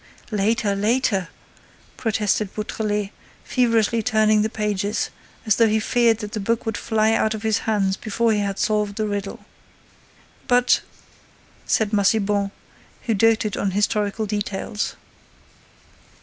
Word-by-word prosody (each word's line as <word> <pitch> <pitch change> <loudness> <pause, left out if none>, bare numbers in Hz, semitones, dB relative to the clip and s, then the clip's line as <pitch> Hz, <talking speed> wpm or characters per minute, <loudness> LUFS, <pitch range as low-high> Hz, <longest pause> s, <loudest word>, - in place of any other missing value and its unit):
"Later, 210 0 +1
later," 205 -3 +1 0.7
protested 215 -3 -1
Beautrelet, 210 -1 -2 0.3
feverishly 230 -2 +2
turning 215 -2 +3
the 215 - 0
pages, 210 -1 -2 0.3
as 215 - +3
though 230 - +5
he 220 0 +2
feared 230 0 +2
that 210 -1 -6
the 215 - -3
book 230 +4 -1
would 225 -2 -2
fly 220 +1 +1
out 220 0 +1
of 215 - -7
his 220 0 +1
hands 195 -3 +1
before 225 +1 0
he 210 - +1
had 200 -1 -2
solved 210 -1 0
the 215 - -1
riddle. 205 -1 -4 1.1
"But—" 245 0 +4 0.9
said 220 -1 +1
Massiban, 200 -1 +2 0.5
who 230 - 0
doted 220 0 +2
on 200 - 0
historical 210 +1 0
details. 205 0 -3
215 Hz, 130 wpm, -22 LUFS, 205-225 Hz, 1.1 s, though